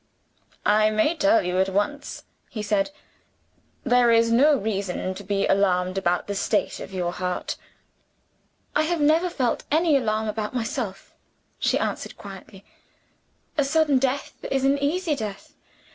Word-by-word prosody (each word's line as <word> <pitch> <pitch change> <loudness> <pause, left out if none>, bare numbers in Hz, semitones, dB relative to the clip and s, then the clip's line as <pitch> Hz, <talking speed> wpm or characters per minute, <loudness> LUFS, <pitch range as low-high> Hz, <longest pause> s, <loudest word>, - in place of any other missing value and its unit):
"I 215 +1 +4
may 215 +10 +2
tell 310 +1 +3
you 180 +1 -1
at 190 0 +2
once," 205 +10 -2 0.3
he 215 - -5
said 205 0 +1 0.9
"there 245 -2 +4
is 230 0 +4
no 280 +5 +5
reason 195 -4 -2
to 200 - -9
be 195 0 0
alarmed 185 -2 +2
about 180 -2 0
the 205 - -3
state 205 +2 0
of - - -8
your 180 -2 -2
heart." 180 0 -3 1.2
"I 300 - +4
have 335 +2 0
never 315 +5 +3
felt 255 -8 -1
any 315 0 +3
alarm 220 -4 0
about 215 +2 -3
myself," 225 -4 -4 0.5
she - - +2
answered - - -3
quietly. - - -11 0.9
"A - - +5
sudden 290 -1 +3
death 270 +1 -1 0.2
is 270 0 0
an 280 +1 +3
easy 310 +3 0
death. 210 -6 -7
225 Hz, 145 wpm, -24 LUFS, 195-285 Hz, 1.2 s, no